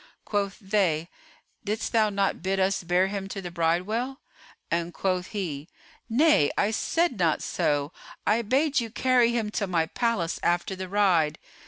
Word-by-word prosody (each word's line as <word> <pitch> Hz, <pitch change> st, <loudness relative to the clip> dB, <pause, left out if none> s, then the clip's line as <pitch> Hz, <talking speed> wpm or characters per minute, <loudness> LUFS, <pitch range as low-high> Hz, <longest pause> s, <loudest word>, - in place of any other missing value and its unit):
Quoth 200 Hz, -2 st, -1 dB
they, 190 Hz, -6 st, 0 dB, 0.5 s
"Didst 215 Hz, +2 st, -2 dB
thou 220 Hz, -2 st, +3 dB
not 200 Hz, -1 st, 0 dB
bid 190 Hz, +2 st, -1 dB
us 190 Hz, 0 st, +1 dB
bear 180 Hz, +2 st, +2 dB
him 195 Hz, 0 st, -4 dB
to 195 Hz, -, -6 dB
the 180 Hz, -2 st, -6 dB
bridewell?"; 185 Hz, -, -1 dB, 0.5 s
and 170 Hz, 0 st, -1 dB
quoth 185 Hz, -1 st, -1 dB
he, 165 Hz, -7 st, -5 dB, 0.4 s
"Nay, 240 Hz, -, +4 dB
I 205 Hz, -, +2 dB
said 330 Hz, -, 0 dB
not 165 Hz, -3 st, +2 dB
so; 145 Hz, 0 st, 0 dB, 0.3 s
I 220 Hz, +3 st, +3 dB
bade 275 Hz, +6 st, +2 dB
you 230 Hz, -2 st, -3 dB
carry 245 Hz, 0 st, +3 dB
him 225 Hz, -3 st, -1 dB
to 205 Hz, -2 st, -1 dB
my 170 Hz, -3 st, +1 dB
palace 195 Hz, -4 st, -1 dB
after 175 Hz, +2 st, 0 dB
the 185 Hz, 0 st, -6 dB
ride." 180 Hz, -7 st, +2 dB
195 Hz, 160 wpm, -26 LUFS, 175-225 Hz, 0.5 s, Nay